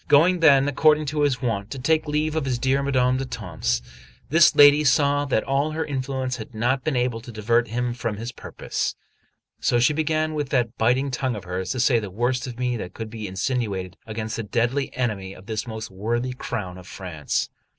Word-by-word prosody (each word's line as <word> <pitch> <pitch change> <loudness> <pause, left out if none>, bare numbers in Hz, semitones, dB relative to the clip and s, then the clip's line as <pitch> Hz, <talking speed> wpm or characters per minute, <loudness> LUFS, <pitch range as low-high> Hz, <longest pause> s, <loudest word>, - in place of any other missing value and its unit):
Going 175 +5 +5
then, 140 -4 +6
according 150 +2 +3
to 150 - 0
his 140 -3 +1
wont, 105 -4 -1
to 135 - -6
take 155 +4 +1
leave 150 +1 0
of 155 -3 0
his 130 -2 0
dear 130 +3 +1
Madame 130 -2 +2
d'Etampes, 60 - -2 0.5
this 160 +2 +6
lady 145 +1 +8
saw 145 0 +3
that 130 -6 +1
all 140 +3 0
her 160 +1 -2
influence 130 -2 -3
had 110 0 -9
not 125 +4 0
been 155 -4 -1
able 125 -2 0
to 120 - -10
divert 115 +2 +1
him 120 +2 -2
from 115 -3 -3
his 115 +3 -5
purpose; - - -4 0.6
so 120 - +2
she 125 +5 +4
began 155 0 0
with 145 -3 -2
that 120 -3 0
biting 130 +5 +1
tongue 130 -1 -1
of 105 - -7
hers 90 +1 -4
to 130 - -4
say 120 0 +4
the 105 -3 -6
worst 120 +6 -1
of 120 -2 -7
me 125 -1 -1
that 95 -4 -7
could 110 -1 -6
be 110 -2 -5
insinuated 95 -2 -2
against 110 0 -4
a - - -2
deadly 120 +6 0
enemy 100 -6 -2
of 95 - -14
this 110 +1 -3
most 110 -2 -6
worthy 120 +6 -2
crown 100 -8 -5
of 90 - -13
France. 85 -8 -3
125 Hz, 205 wpm, -24 LUFS, 110-140 Hz, 0.6 s, lady